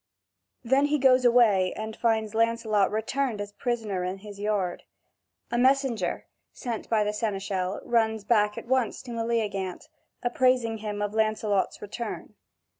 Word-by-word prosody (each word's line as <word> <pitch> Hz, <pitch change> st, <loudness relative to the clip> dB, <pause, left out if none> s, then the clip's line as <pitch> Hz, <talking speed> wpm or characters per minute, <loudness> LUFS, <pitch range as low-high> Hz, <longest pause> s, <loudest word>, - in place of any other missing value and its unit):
Then 265 Hz, +4 st, +3 dB
he 300 Hz, +1 st, +2 dB
goes 255 Hz, -2 st, +4 dB
away 220 Hz, -7 st, +4 dB
and 220 Hz, 0 st, -5 dB
finds 220 Hz, -2 st, 0 dB
Lancelot 225 Hz, -3 st, +2 dB
returned 225 Hz, +2 st, -1 dB
as 205 Hz, 0 st, -5 dB
prisoner 220 Hz, -6 st, -2 dB
in 185 Hz, +1 st, -3 dB
his 200 Hz, 0 st, -11 dB
yard. 205 Hz, -4 st, -1 dB, 0.7 s
A 240 Hz, -, +1 dB
messenger, 255 Hz, -7 st, +1 dB, 0.3 s
sent 235 Hz, -3 st, -5 dB
by 220 Hz, -2 st, +3 dB
the 210 Hz, 0 st, -1 dB
seneschal, 195 Hz, -3 st, -2 dB
runs 220 Hz, -2 st, +1 dB
back 210 Hz, -1 st, +2 dB
at -, -, -6 dB
once 255 Hz, -2 st, 0 dB
to 250 Hz, -, -8 dB
Meleagant, 225 Hz, -1 st, -2 dB, 0.3 s
appraising 245 Hz, -2 st, +2 dB
him 210 Hz, -1 st, -3 dB
of 205 Hz, 0 st, -2 dB
Lancelot's 215 Hz, -3 st, 0 dB
return. 230 Hz, +3 st, -6 dB
220 Hz, 140 wpm, -27 LUFS, 205-240 Hz, 0.7 s, goes